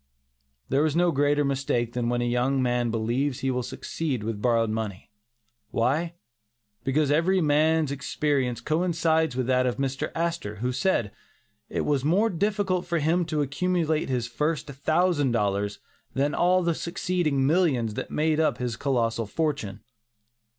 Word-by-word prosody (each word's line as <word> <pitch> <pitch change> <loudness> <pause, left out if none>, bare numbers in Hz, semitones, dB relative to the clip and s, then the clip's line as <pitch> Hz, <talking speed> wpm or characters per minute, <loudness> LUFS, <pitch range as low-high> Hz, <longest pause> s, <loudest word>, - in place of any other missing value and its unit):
There 135 +3 +2
is 155 -1 +1
no 175 0 +3
greater 145 0 +2
mistake 130 -4 -1
than 120 -1 -1
when 120 0 0
a - - 0
young 125 +3 +1
man 120 -2 +1
believes 120 +5 -1
he 135 - 0
will 125 0 -1
succeed 130 0 -4
with 105 -1 -4
borrowed 115 -2 +2
money. 110 -4 -5 0.6
Why? 150 +9 0 0.7
Because 145 +2 +1
every 175 +5 +3
man's 155 -1 +2
experience 140 -3 -1
coincides 160 -2 +1
with 130 -1 0
that 130 0 +2
of 125 -1 -1
Mr. 135 +2 -2
Astor, 165 -11 -2
who 125 +4 -2
said, 125 - 0 0.6
'it - - -1
was 145 -3 0
more 195 +9 +2
difficult 190 -1 0
for 170 -1 0
him 165 +3 +1
to 155 -2 0
accumulate 160 +2 0
his 125 -3 0
first 150 +5 -1
thousand 145 0 +1
dollars, 100 -2 0 0.4
than 140 +2 +1
all 180 +1 +3
the 170 0 +1
succeeding 170 -5 -1
millions 140 - +2
that - - -5
made 155 0 +1
up 160 - +2
his 120 -2 -3
colossal 115 -5 0
fortune. 110 -8 -2
140 Hz, 155 wpm, -26 LUFS, 120-160 Hz, 0.7 s, no